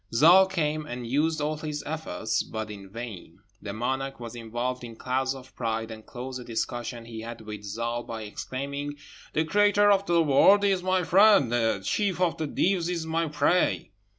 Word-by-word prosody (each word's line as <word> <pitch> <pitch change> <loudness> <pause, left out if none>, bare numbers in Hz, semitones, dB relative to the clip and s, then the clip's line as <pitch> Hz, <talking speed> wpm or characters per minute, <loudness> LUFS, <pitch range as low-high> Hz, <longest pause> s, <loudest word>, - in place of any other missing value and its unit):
Zâl 175 +10 +7
came, 155 -4 -1
and 120 0 -5
used 155 +6 +1
all 150 +1 -1
his 150 -1 -5
efforts, 150 -7 -2
but 110 -1 -5
in 100 -2 -10
vain; 115 -3 -8 0.2
the 100 - -5
monarch 130 +5 -3
was 120 -1 -7
involved 120 +2 -3
in 115 -1 -8
clouds 130 +2 -1
of 130 0 -13
pride, 115 -1 -2
and 110 0 -9
closed 130 +1 -6
a - - -8
discussion 120 0 -4
he 115 -1 -7
had 115 0 -7
with 105 -1 -7
Zâl 115 +3 -4
by 110 -1 -5
exclaiming, 140 +6 -5 0.4
"The 160 - +1
Creator 205 +3 +4
of 195 0 +2
the 170 -1 +4
world 160 +8 +5
is 195 -2 +2
my 185 0 +1
friend; 195 - +5
the 115 -4 +1
chief 200 -4 0
of 180 -2 +1
the 155 - -2
Deevs 180 +2 +1
is 170 -2 -2
my 165 +1 0
prey." 150 - +1
135 Hz, 185 wpm, -27 LUFS, 115-165 Hz, 0.4 s, Zâl